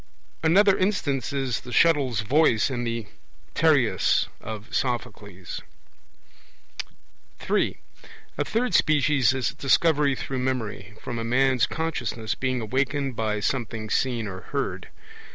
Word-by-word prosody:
Another 190 +5 +5
instance 175 -9 0
is 135 -4 -1
the 125 - -11
'shuttle's 135 -8 +3
voice' 130 0 +3
in 120 -2 -2
the 115 -1 -3 0.5
Tereus - - +3
of 110 0 -8
Sophocles. 105 -7 -3 1.8
(3) - - 0 0.6
A - - 0
third 240 +3 -1
species 145 -4 +4
is 130 -3 -1
Discovery 145 0 +3
through 130 0 -4
memory, 120 -5 -3
from 120 -2 -5
a - - -3
man's 130 +1 +2
consciousness 125 -9 -3
being 130 -2 -2
awakened 135 +3 -1
by 110 -2 -1
something 110 -2 -2
seen 120 -4 0
or 95 -2 -6
heard. - - -4
130 Hz, 115 wpm, -25 LUFS, 115-140 Hz, 1.8 s, Another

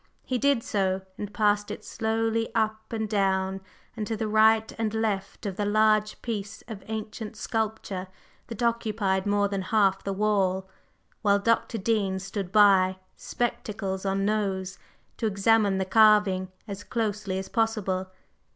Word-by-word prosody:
He 255 -1 -2
did 275 -3 +2
so, 190 -2 0
and 205 +1 -6
passed 205 -1 +1
it - - -7
slowly 225 0 -1
up 220 -1 -1
and 220 -1 -2
down 195 -2 0 0.3
and 210 - -4
to 225 - -2
the 220 - -2
right 220 +1 +4
and 220 -2 0
left 210 -4 -2
of 195 -2 -3
the 205 - 0
large 215 0 +2
piece 215 -3 -5
of 220 -4 -7
ancient 220 0 -5
sculpture 215 -5 -3 0.4
that 235 0 -5
occupied 210 -4 0
more 205 0 +2
than 195 -1 -2
half 195 -1 +2
the 200 - -2
wall, 190 -2 +1 0.5
while 200 -2 +4
Dr. 230 +2 +1
Dean 200 -2 0
stood 195 -1 -5
by, 195 -3 +5 0.2
spectacles 205 -5 -3
on 195 0 0
nose, 195 -3 -1 0.4
to 225 - 0
examine 205 0 +3
the 190 - 0
carving 205 -2 +4 0.2
as 200 -1 -6
closely 210 -5 -2
as 190 - -4
possible. 210 -5 0
210 Hz, 150 wpm, -27 LUFS, 195-220 Hz, 0.5 s, by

